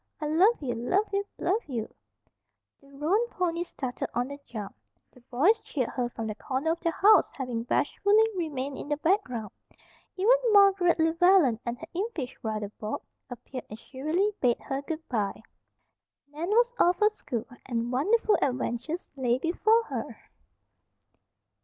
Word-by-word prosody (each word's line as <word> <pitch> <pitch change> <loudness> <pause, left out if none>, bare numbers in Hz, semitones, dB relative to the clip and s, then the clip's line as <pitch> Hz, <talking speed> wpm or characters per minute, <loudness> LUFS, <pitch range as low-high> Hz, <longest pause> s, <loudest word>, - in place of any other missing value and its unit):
I 305 - -3
love 360 +10 +4
you, 245 -3 -1
love 305 - 0
you, 400 0 +1
love 400 +6 0
you." 235 -6 -3 0.9
The 275 - -20
roan 340 +12 +1
ponies 345 -1 -2
started 255 -3 -4
on 245 +2 0
the 280 0 -8
jump. 210 -4 -7 0.4
The 250 - -20
boys 330 - +3
cheered 255 -6 -2
her 245 -2 -2
from 225 -1 -6
the 215 - -3
corner 265 +8 -2
of 335 - -2
the 335 - 0
house, 400 +3 +5
having 250 -4 -3
bashfully 410 - +2
remained 285 -6 -3
in - - -7
the 295 - 0
background. 270 - 0 0.7
Even 415 +7 +5 0.2
Margaret 390 -4 +5
Llewellen 325 - +4
and 235 +1 -2
her 325 - -10
impish 355 - -3
brother, 215 -2 -3
Bob, 215 0 -4 0.3
appeared 250 +1 -8
and 215 - -8
shrilly 310 - -1
bade 245 -2 +3
her 275 -1 -3
goodbye. 270 - -3 0.9
Nan 325 +5 -4
was 475 +3 +3
off 355 0 +4
for 425 +2 +4
school, 235 - -5 0.2
and 235 -1 -2
wonderful 420 - +2
adventures 260 +5 -2
lay 250 -3 +1
before 435 - +2
her! - - -5
300 Hz, 155 wpm, -28 LUFS, 245-380 Hz, 0.9 s, house